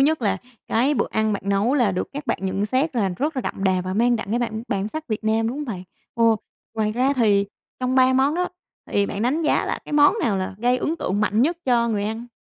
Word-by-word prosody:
nhất 295 -1 +2
là 195 -2 +1 0.3
cái 260 +6 +2
bữa - - +1
ăn 220 -1 +1
bạn 200 - -3
nấu 200 +7 +2
là 240 -8 +3
được 180 - -2
các 290 +1 -6
bạn - - 0
nhận 190 +2 -1
xét 260 +8 +1 0.3
rất 295 - -2
là - - +1
đậm 195 - -4
đà 185 -1 +2
và 185 - -3
mang 240 +2 +3
đậm 200 -3 -6
cái 235 - +1
bản 225 -2 -2
bản 200 +1 -1
sắc 315 +7 -6
Việt 215 0 -3
Nam, 225 +1 +1
đúng 250 - -4
hông 300 - -3
bạn? 200 -9 -5 0.3
Ồ! 230 -2 +4 0.4
Ngoài 215 -1 0
ra 255 +4 +2
thì 205 -4 +3 0.3
trong 255 0 0
3 260 0 +5
món 270 +4 +3
á, 360 +1 0 0.4
thì 200 0 +2
bạn 200 +2 -4
đánh 285 +7 +1
giá 305 - +2
là - - -2
cái - - -9
món 295 +6 +5
nào 205 -4 +1
là 185 0 -3
gây 245 +2 +2
ấn 320 +5 -1
tượng 205 - -1
mạnh 210 +2 +2
nhất 330 +6 +1
cho 235 -2 +2
người 205 -3 -1
ăn? 225 +3 -4
230 Hz, 260 wpm, -23 LUFS, 205-265 Hz, 0.4 s, 3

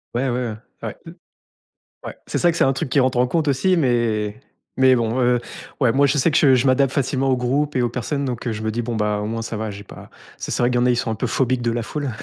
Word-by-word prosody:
Ouais, 130 +3 0
ouais, 120 -3 -2 0.3
Ouais. - - -6 1.1
Ouais. - - -6
C'est - - -2
ça 175 - +4
que 165 - -5
c'est - - +3
un 135 - +3
truc 130 - -3
qui 140 - +2
rentre 130 -1 +1
en 125 - +3
compte 155 +4 0
aussi 145 +7 +2
mais 120 -6 0 0.4
mais 130 -1 +5
bon, 115 +1 -1
heu 120 0 +3 0.4
ouais 125 -4 +3
moi 140 +3 +3
je 140 +2 +1
sais 150 +4 +2
que - - +2
je 135 -3 +5
je 125 +2 +1
m'adapte 130 0 +3
facilement 135 -1 0
au 130 - +2
groupe 140 +4 -1
et 125 - +2
aux 120 - +1
personnes 140 +4 -3
donc 125 -1 -4
heu, 115 - 0
je 110 0 -5
me 110 - -1
dis: 120 +2 -2
«Bon 115 0 -4
bah 105 -1 0
au 105 - -3
moins 115 +1 -3
ça 115 - -5
va, 110 0 -3
j'ai 100 0 -8
pas» - - -13 0.3
C'est - - -4
vrai 120 - +2
qu'il 120 - +1
y - - +2
en - - +2
a, - - +3
ils 120 - +2
sont 115 - -1
un 110 - -2
peu 125 - -2
phobiques 130 +1 0
de 120 -1 0
la 120 0 -2
foule. 145 +3 -4
125 Hz, 295 wpm, -21 LUFS, 115-135 Hz, 1.1 s, mais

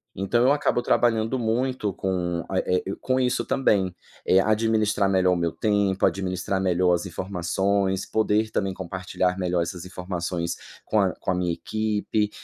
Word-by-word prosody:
Então 100 +6 +1
eu 130 - +5
acabo 145 -4 +1
trabalhando 115 +1 +2
muito 120 -1 0
com 90 -3 -2
a 95 - 0
eh 90 0 0
i 95 - -3
com 130 0 +1
isso 125 -1 +1
também. 95 -9 +1 0.3
Eh, 95 - +5
administrar 110 -1 +2
melhor 95 -1 +3
o - - +1
meu 85 -1 0
tempo, 100 -1 +1
administrar 95 0 -1
melhor 90 -1 +2
as 85 +2 -1
informações. 95 +1 -1
Poder 110 0 +1
também 95 -3 -1
compartilhar 95 0 -2
melhor 90 -1 0
essas 85 +1 -4
informações 90 -2 -3 0.3
com 110 - +1
a 95 -3 +1
com - - -3
a - - +1
minha 90 -1 0
equipe. 105 +1 -1
95 Hz, 165 wpm, -25 LUFS, 90-110 Hz, 0.3 s, eu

